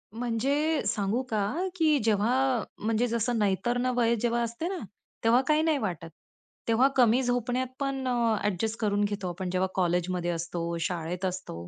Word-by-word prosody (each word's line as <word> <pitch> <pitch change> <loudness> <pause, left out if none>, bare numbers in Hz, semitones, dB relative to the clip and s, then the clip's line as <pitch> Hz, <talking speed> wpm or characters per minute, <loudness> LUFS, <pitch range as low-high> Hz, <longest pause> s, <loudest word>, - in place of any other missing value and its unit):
म्हणजे 275 +7 0
सांगू 210 +3 0
का, 220 - -1
की 315 -4 +3
जेव्हा 220 +1 +2 0.5
म्हणजे 225 +2 +1
जसं 235 0 0
नैतर्ण 215 +5 +1
वय 235 -1 +3
जेव्हा 235 0 +1
असते 235 +9 -3
ना, 380 -1 -3 0.5
तेव्हा 235 +3 +5
काही 305 0 +4
नाही 315 -2 +2
वाटत. 175 -7 -4 0.6
तेव्हा 235 +4 +4
कमी 245 0 +5
झोपण्यात 245 +1 0
पण 270 -2 -2 0.4
ॲडजस्ट 210 +3 -1
करून 205 -2 +1
घेतो 205 -2 -2
आपण 180 +1 -4
जेव्हा 185 +1 +1
कॉलेजमध्ये 180 -1 0
असतो, 170 0 -3
शाळेत 175 +1 -3
असतो. 180 - -5
225 Hz, 150 wpm, -28 LUFS, 185-245 Hz, 0.6 s, तेव्हा